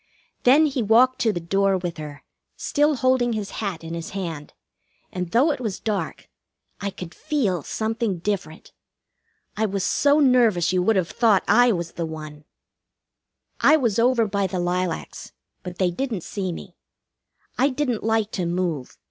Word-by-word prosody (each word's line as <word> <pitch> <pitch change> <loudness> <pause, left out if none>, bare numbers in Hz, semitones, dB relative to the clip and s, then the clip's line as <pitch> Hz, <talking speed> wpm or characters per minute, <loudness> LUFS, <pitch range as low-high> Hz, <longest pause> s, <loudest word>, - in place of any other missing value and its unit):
Then 280 +6 +6
he 275 -4 -1
walked 240 +4 +4
to 225 - +2
the 175 - -3
door 195 +3 +1
with 175 -2 -5
her, 150 -2 -8 0.3
still 295 0 +1
holding 255 -2 +2
his 210 -2 -4
hat 190 -6 -4
in 165 0 -6
his 165 -1 -5
hand, 165 -6 -5 0.6
and 180 -2 -4
though 260 - +3
it - - -3
was 220 -6 -4
dark 210 -3 -3 0.5
I 200 - -2
could 180 -3 -9
feel 240 - -1
something 220 - -2
different. 175 -3 -4 0.8
I 220 +1 +1
was 195 -1 -2
so 285 +8 +3
nervous 235 - +3
you 180 - +2
would 220 +5 +2
have 175 -4 0
thought 220 -1 +3
I 245 +1 +5
was 170 -4 -3
the 170 -1 -4
one. 155 -1 -9 1.1
I 310 - +6
was 235 -7 0
over 235 -1 +3
by 200 -1 -1
the 185 0 -3
lilacs; 175 -1 -3 0.3
but 180 -2 -8
they 185 -2 +1
didn't 225 0 -3
see 190 -3 -4
me. 175 +2 -9 0.9
I 270 +3 +4
didn't 255 -4 -2
like 220 -1 +1
to 180 -3 -2
move. 170 -6 -3
200 Hz, 165 wpm, -23 LUFS, 175-240 Hz, 1.1 s, Then